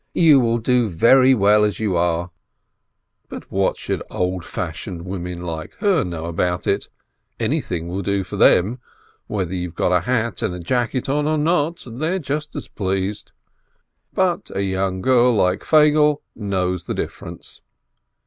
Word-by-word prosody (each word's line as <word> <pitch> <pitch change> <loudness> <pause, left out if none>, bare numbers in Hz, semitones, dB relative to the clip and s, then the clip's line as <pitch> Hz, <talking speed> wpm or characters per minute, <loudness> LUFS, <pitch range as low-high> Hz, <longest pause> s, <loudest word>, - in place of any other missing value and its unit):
You 155 -5 +6
will 115 -2 +2
do 120 0 +2
very 130 +8 +5
well 105 0 +4
as 105 -4 0
you 105 -4 0
are." 85 +1 0 1.0
But - - -9
what 95 0 +1
should - - -3
old 90 -1 -2
fashioned 85 +1 -5
women 90 -2 -5
like 80 -2 -6
her 200 -7 +2
know 85 -2 -5
about 90 +1 -1
it? 100 - -1 0.5
Anything 85 -2 -2
will 90 +3 -3
do 100 0 0
for 90 - -7
them. 105 +8 +4 0.5
Whether 95 -4 -2
you've 90 -2 -5
a 90 0 +3
hat 115 +2 -1
and 90 -1 -3
jacket 125 +2 -1
on 145 +2 0
or 155 0 +1
not, 160 +1 0
they're 155 +10 -2
just 150 -1 -4
as - - -5
pleased. 95 +1 -3 0.8
But - - 0
a 100 - 0
young 95 -1 -1
girl 125 -1 +4
like 90 -2 +2
Feigele 150 -1 +4
knows 90 -4 -2
the - - -3
difference. - - -7
100 Hz, 150 wpm, -21 LUFS, 90-130 Hz, 1.0 s, You